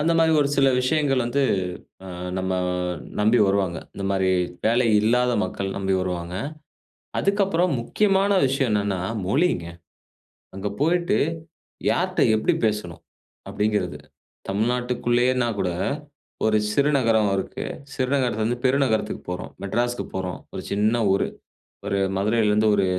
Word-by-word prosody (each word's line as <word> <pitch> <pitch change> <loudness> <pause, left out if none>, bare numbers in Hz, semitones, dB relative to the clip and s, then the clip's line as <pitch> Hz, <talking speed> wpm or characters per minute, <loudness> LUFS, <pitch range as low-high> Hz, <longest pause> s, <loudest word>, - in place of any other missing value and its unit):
அந்தமாரி 165 +1 +3
ஒரு 140 - +2
சில 135 -1 +5
விஷயங்கள் 135 -1 +1
வந்து 130 +4 0 0.6
அ - - -8 0.3
நம்ம 95 0 -2 0.7
நம்பி 110 +3 +4
வருவாங்க. 95 -3 +1 0.2
இந்தமாரி 95 -1 0 0.4
வேலை 120 +2 +3
இல்லாத 125 +3 +2
மக்கள் 100 0 -3
நம்பி 95 -1 0
வருவாங்க. 90 -1 -3 0.8
அதுக்கப்புறம் 195 -3 +2
முக்கியமான 195 - +2 0.2
விஷயம் 135 -2 0
என்னன்னா, 100 -3 0 0.3
மொழிங்க. 135 - +1 0.9
அங்க 100 +1 -3
போயிட்டு, 175 +5 +2 0.7
யார்ட்ட - - 0
எப்டி 110 - +2
பேசணும்? 105 -6 -2 0.5
அப்டிங்கிறது. 105 -8 -1 0.5
தமிழ்நாட்டுக்குள்ளேயேன்னா 120 +3 +1
கூட 90 - +1 0.8
1 110 0 +3 0.2
சிறு 140 +5 +3
நகரம் 110 -4 +3
இருக்கு. 95 - -4 0.3
சிறு 130 -3 -1
நகரத்தில 125 -5 0
இருந்து 120 +2 -1
பெரு 130 +2 +4
நகரத்துக்கு 110 -4 -1
போறோம். 90 - -5
மெட்ராஸ்க்கு 120 +5 -1
போறோம். 95 -1 -3
1 - - -4
சின்ன 105 +4 +2
ஊரு. 100 - +1 0.6
ஒரு 100 - 0 0.2
மதுரையில 105 +2 +2
இருந்து 105 +1 +3
ஒரு 100 - +2
115 Hz, 125 wpm, -24 LUFS, 100-130 Hz, 0.9 s, சில